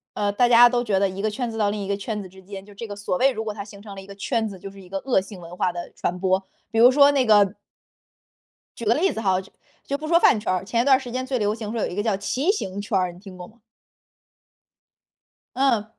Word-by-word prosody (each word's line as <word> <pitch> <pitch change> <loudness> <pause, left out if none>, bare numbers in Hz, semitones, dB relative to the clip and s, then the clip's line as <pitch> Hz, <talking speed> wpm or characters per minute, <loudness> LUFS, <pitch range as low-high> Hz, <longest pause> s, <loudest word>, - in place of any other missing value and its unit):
呃， 205 -1 0
大 245 +3 +3
家 240 +1 +8
都 240 0 0
觉 200 -5 +1
得 200 - +2
一 190 +1 -6
个 215 - 0
圈 240 +2 -3
子 225 - -6
到 205 -2 +2
另 205 0 -3
一 195 - -5
个 200 - 0
圈 210 +1 -4
子 190 - -9
之 190 +1 -17
间， 195 0 -9
就 205 - -15
这 230 +4 -7
个 205 - -6
所 200 -3 -2
谓 270 +1 +4
如 220 - -5
果 215 - -3
它 200 -1 -6
形 200 -1 -13
成 205 -2 -10
了 195 - -8
一 190 - -13
个 200 - -11
圈 225 +2 -1
子， 190 -2 -10
就 195 - -8
是 195 0 -14
一 180 - -15
个 195 - -3
恶 220 -2 +1
性 190 -1 -11
文 170 +1 -10
化 180 - 0
的 175 0 -7
传 180 +1 -3
播， 190 +1 +1 0.3
比 225 - -3
如 245 +3 +7
说 280 +1 +6
那 275 -3 +2
个 205 -2 +4 1.2
举 235 - -6
个 220 - +4
例 360 +9 +1
子 - - -5
哈， 190 -3 +2
就 190 - -18 0.3
就 280 - -3
不 310 +2 -7
说 335 +1 +4
饭 225 - +4
圈 210 - -2
儿。 185 0 -1
前 230 +3 0
一 - - -2
段 265 -1 +5
时 250 -3 -8
间 255 +1 -3
最 260 -1 -1
流 210 -1 0
行 220 -2 -6
说 230 -2 -3
有 - - 0
一 175 - -7
个 205 - -1
叫 215 -3 +1
骑 260 - 0
行 200 - -4
圈 205 -1 -1
儿， 180 -1 0
你 175 - -15
听 190 -2 -12
过 180 - -9
吗？ 225 +4 -23 1.9
嗯， 250 -6 +2
210 Hz, 310 characters per minute, -23 LUFS, 195-240 Hz, 1.9 s, 家